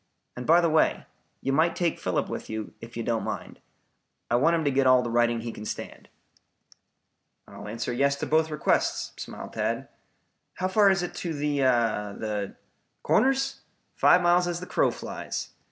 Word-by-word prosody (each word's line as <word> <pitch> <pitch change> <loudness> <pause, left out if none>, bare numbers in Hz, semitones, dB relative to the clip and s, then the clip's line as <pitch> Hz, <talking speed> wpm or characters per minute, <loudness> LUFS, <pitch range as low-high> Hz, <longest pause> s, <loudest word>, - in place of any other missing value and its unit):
And 125 - -6
by 170 +2 +6
the 170 - +2
way, 155 0 +2 0.4
you 135 - -1
might 165 +4 +3
take 170 -2 0
Philip - - -1
with - - -6
you, 110 -1 -5
if 115 0 -10
you 115 - -2
don't 115 -1 0
mind. - - -6 0.7
I - - +4
want 160 +7 +4
him 160 -2 -1
to 140 - +3
get 135 0 +2
all 130 -1 +6
the 120 - -3
riding 120 0 +2
he 115 0 -5
can 105 - -9
stand." - - -7 1.4
"I'll - - -10
answer 115 +1 -3
yes 140 +3 +2
to - - -4
both, 160 +1 +2
requests," 150 -1 0
smiled - - -8
Tad. - - -2 0.7
"How 185 - -1
far 200 +1 +5
is 190 -2 +2
it 175 - -4
to 165 -3 -3
the 145 0 -1
the 110 -5 0 0.2
" - - -48
"Corners? 270 +1 +2 0.4
Five 180 - +5
miles 175 +1 +4
as 175 0 -2
the 180 - -7
crow - - +2
flies. - - -5
140 Hz, 185 wpm, -27 LUFS, 120-170 Hz, 1.4 s, by